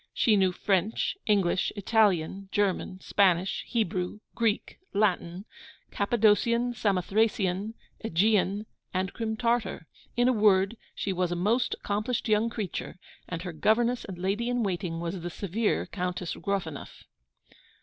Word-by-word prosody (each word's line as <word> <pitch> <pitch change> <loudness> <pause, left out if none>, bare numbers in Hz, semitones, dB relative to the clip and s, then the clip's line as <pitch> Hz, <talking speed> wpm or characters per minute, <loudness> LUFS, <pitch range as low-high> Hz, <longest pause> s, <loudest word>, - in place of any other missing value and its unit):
She 220 - +4
knew 190 -2 +3
French, 195 - 0
English, 195 -4 +2
Italian, 195 -3 +1
German, 190 -2 0
Spanish, 185 -1 +2
Hebrew, 185 -4 -1
Greek, 225 -2 -1 0.2
Latin, 190 -2 0 0.5
Cappadocian, 235 +3 +2
Samothracian, 205 0 0 0.3
Aegean, 205 +1 +2 0.3
and 190 +1 -1
Crim 220 -1 -3
Tartar. 230 -7 0 0.3
In 245 +1 +4
a 255 - +4
word, 205 -1 +4 0.2
she 195 - -2
was 180 -1 0
a - - 0
most 225 +7 +1
accomplished 210 +5 -2
young 215 +1 +3
creature; 215 -7 -5 0.3
and 165 0 -4
her 180 -2 -5
governess 235 +8 +2
and 190 -3 -7
lady 200 +6 -1
in 245 -1 0
waiting 180 -4 -2
was 170 +2 -3
the 175 - -4
severe 205 +5 -1
Countess 180 -2 -3
Gruffanuff. 180 -7 -4
200 Hz, 130 wpm, -28 LUFS, 180-220 Hz, 0.5 s, She